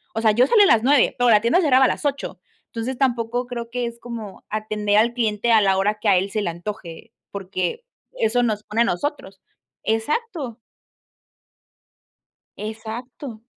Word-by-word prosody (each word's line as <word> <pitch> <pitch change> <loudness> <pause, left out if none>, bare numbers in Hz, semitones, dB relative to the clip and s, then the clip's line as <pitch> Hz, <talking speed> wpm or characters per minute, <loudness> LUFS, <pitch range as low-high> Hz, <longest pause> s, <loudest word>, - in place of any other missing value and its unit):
o 225 - -1
sea, 220 -1 +4
yo 245 +5 +4
salía 430 +2 +6
a - - +4
las 230 -7 +4
9 275 0 +4
pero 245 0 +3
la 210 -2 +6
tienda 235 +10 +3
cerraba 265 -5 +5
a - - +5
las - - -4
8, 280 -1 -2 0.3
entonces 240 +3 -4
tampoco 245 -2 0
creo 235 -2 -6
que 245 0 -2
es 235 0 -6
como 230 -5 -8
atender 210 -1 0
al 230 +2 +3
cliente 230 -1 0
a 225 - +7
la 195 -1 +3
hora 205 +2 +1
que 210 - -3
a 190 - +5
él 190 +2 0
se 215 - -1
le 190 - -1
antoje, 175 +2 -8 0.2
porque 190 - -3 0.3
eso 245 - +1
nos 215 -3 0
expone 215 +2 -1
a - - +5
nosotros 195 -3 -3 0.4
exacto. 270 - -2 2.0
Exacto. 225 +2 -7
225 Hz, 175 wpm, -22 LUFS, 210-245 Hz, 2.0 s, a